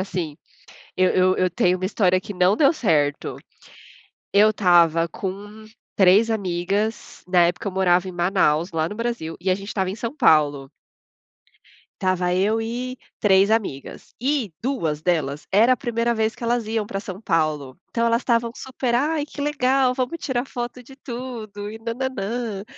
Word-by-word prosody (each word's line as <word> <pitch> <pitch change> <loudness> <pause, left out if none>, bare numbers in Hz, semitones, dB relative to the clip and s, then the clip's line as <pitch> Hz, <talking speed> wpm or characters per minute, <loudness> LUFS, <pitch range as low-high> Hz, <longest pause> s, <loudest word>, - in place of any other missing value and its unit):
assim, 175 -6 -4 0.6
eu 185 0 +3
eu 185 0 +3
eu 185 0 +1
tenho 180 +1 +2
uma 185 - -4
história 185 -3 +2
que 205 - -7
não 180 +3 +3
deu 275 0 +5
certo. 150 - 0 1.0
Eu 210 +2 +6
estava 170 -4 +4
com 205 +5 -7 0.3
3 200 +4 +5
amigas 200 +1 -2
na 180 -2 +4
época 175 +3 -3
eu - - -2
morava 185 -1 +2
em - - -5
Manaus, 175 -2 +1
lá 160 0 0
no 210 - -7
Brasil, 230 -9 -3
e 190 - -2
a 185 - +3
gente 200 0 -9
estava 190 -3 -1
em 195 - -4
São 230 +5 -5
Paulo. 145 - +3 1.3
Tava 185 -2 +1
eu 210 +4 +1
e 245 +3 -4 0.2
3 195 0 +4
amigas, 200 -12 -3
e 260 - 0
2 165 - -1
delas, 155 -4 -1
era 225 +6 +5
a 255 - +2
1ª 235 -1 -1
vez 220 0 0
que - - -7
elas 235 -1 0
iam 220 -1 -1
pra 195 - -4
São 195 -1 -8
Paulo. 155 -7 -1
Então 230 0 -1
elas 230 +1 +2
estavam 235 -1 +1
super: 260 -2 -3
"Ai, 295 +4 +1
que 295 - -10
legal, 270 -3 +2
vamos 260 +6 -2
tirar 255 -3 -1
foto 245 0 -6
de 270 - -15
tudo 235 -5 -7
e 220 - -8
nã-nã-nã", 230 -3 -3
205 Hz, 170 wpm, -22 LUFS, 180-235 Hz, 1.3 s, Eu